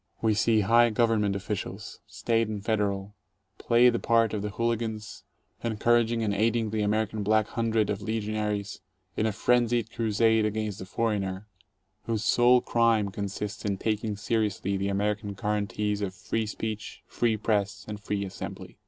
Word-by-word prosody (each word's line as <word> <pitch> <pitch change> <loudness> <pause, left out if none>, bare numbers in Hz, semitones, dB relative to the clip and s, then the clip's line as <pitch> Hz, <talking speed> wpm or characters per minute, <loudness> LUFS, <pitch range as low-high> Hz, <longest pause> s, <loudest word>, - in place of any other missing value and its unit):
We 110 -1 +2
see 110 +1 +3
high 120 +4 +5
Government 110 -3 +2
officials, 100 0 -5
State 115 +2 0
and 105 -1 -5
Federal, 100 -2 -1 0.5
play 120 +1 +4
the 120 - -1
part 115 -1 +2
of 105 - -2
the 105 - -3
hooli 115 +2 0
gans, 110 -2 -5 0.4
encouraging 115 0 +2
and 105 -2 0
aiding 110 +1 +1
the 110 -1 -1
American 105 +1 0
Black 110 +1 +3
Hundred 110 -2 0
of 105 0 -3
legionaries, 105 -1 -2 0.3
in 110 - +1
a - - +1
frenzied 120 +1 +1
crusade 110 0 +2
against 105 -1 -2
the 95 - -7
"foreigner," 100 -3 -2 0.6
whose 110 -2 -1
sole 120 +2 +5
crime 115 -3 +2
consists 100 +2 -5
in 100 -3 -1
taking 110 0 -1
seriously 105 -2 -1
the 100 0 -1
American 105 +1 -1
guarantees 105 0 -1
of 95 -2 -3
free 105 +4 -2
speech, 110 0 -5
free 115 -2 0
press, 105 -1 -1
and 105 -1 -6
free 100 0 -2
assembly. 95 - -8
110 Hz, 155 wpm, -27 LUFS, 100-115 Hz, 0.6 s, high